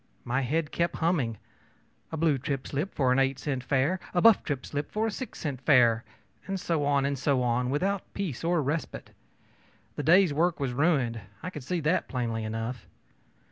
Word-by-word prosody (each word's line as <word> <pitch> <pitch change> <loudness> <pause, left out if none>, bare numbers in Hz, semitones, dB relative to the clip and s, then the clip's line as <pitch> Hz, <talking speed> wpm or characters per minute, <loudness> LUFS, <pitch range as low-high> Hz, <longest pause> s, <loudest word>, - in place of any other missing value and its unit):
My 130 +3 0
head 150 +4 -1
kept 170 0 0
humming, 150 -10 0 0.7
ōA 160 - -4
blue 155 -3 +3
trip 135 -1 -3
slip 150 +8 -3
for 130 -3 +2
an 130 - +3
eight 135 0 +2
cent 135 -2 -3
fare, 140 +8 +1 0.2
a - - +4
buff 230 -3 +7
trip 140 -3 -3
slip 145 0 -4
for 215 +1 0
a 225 - 0
six 255 +2 -6
cent 140 -5 -4
fare,ö 125 -5 +5 0.5
and 195 -1 -2
so 165 -4 0
on 140 -1 +2
and 140 -1 -1
so 135 -2 +1
on, 125 +1 +1
without 190 +8 -1
peace 175 -11 -3
or 170 -2 +2
respite. 150 +4 -3 0.9
The - - -1
day's 175 0 +5
work 170 +3 +1
was 135 -3 -1
ruined 130 -6 +1 0.2
I 180 - -4
could 150 -6 -8
see 175 +5 -2
that 160 +4 +1
plainly 115 -3 -2
enough. 115 +3 -4
145 Hz, 190 wpm, -28 LUFS, 130-170 Hz, 0.9 s, buff